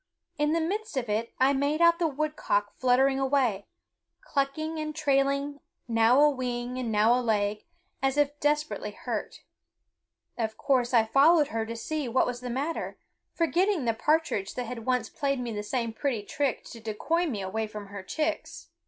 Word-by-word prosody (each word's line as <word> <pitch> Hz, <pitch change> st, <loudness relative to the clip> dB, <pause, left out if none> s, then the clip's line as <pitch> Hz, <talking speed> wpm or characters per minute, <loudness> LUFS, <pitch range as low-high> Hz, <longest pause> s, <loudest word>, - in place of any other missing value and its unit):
In 295 Hz, +1 st, +2 dB
the 335 Hz, -, +2 dB
midst 400 Hz, +1 st, -3 dB
of 240 Hz, -4 st, -2 dB
it 220 Hz, +2 st, -1 dB
I 265 Hz, +2 st, +4 dB
made 285 Hz, +3 st, 0 dB
out 335 Hz, 0 st, +5 dB
the 340 Hz, -, +2 dB
woodcock 295 Hz, -9 st, -1 dB
fluttering 265 Hz, +2 st, +3 dB
away, 260 Hz, -7 st, +1 dB, 0.5 s
clucking, 310 Hz, +3 st, -2 dB
and 305 Hz, 0 st, -4 dB
trailing 280 Hz, -1 st, +1 dB, 0.3 s
now 230 Hz, +2 st, +4 dB
a 300 Hz, -, +7 dB
wing 250 Hz, -1 st, -3 dB
and 240 Hz, -3 st, -2 dB
now 215 Hz, +2 st, +4 dB
a 250 Hz, -, +2 dB
leg, 210 Hz, -3 st, 0 dB, 0.4 s
as 270 Hz, +1 st, +1 dB
if 290 Hz, 0 st, +1 dB
desperately 300 Hz, +1 st, 0 dB
hurt. -, -, -5 dB, 1.0 s
Of 220 Hz, -1 st, -2 dB
course 255 Hz, -4 st, +1 dB
I 230 Hz, -3 st, +5 dB
followed 290 Hz, +6 st, +5 dB
her 225 Hz, 0 st, -2 dB
to 230 Hz, -, -5 dB
see 295 Hz, +4 st, -3 dB
what 255 Hz, +2 st, +2 dB
was 245 Hz, 0 st, -4 dB
the 250 Hz, -, -5 dB
matter, 280 Hz, +7 st, -3 dB, 0.4 s
forgetting 345 Hz, -1 st, +1 dB
the 230 Hz, -, +2 dB
partridge 300 Hz, -6 st, 0 dB
that 250 Hz, -, -3 dB
had 230 Hz, -1 st, -7 dB
once 250 Hz, -3 st, +1 dB
played 275 Hz, +1 st, -1 dB
me 240 Hz, -1 st, -3 dB
the 210 Hz, -1 st, -3 dB
same 230 Hz, +1 st, -2 dB
pretty 240 Hz, -4 st, -2 dB
trick 275 Hz, +4 st, -1 dB
to 230 Hz, -, -9 dB
decoy 270 Hz, +11 st, -1 dB
me 215 Hz, -9 st, -3 dB
away 220 Hz, +4 st, -2 dB
from 210 Hz, -1 st, -8 dB
her 200 Hz, 0 st, -7 dB
chicks. 310 Hz, +11 st, -3 dB
260 Hz, 180 wpm, -28 LUFS, 230-295 Hz, 1.0 s, a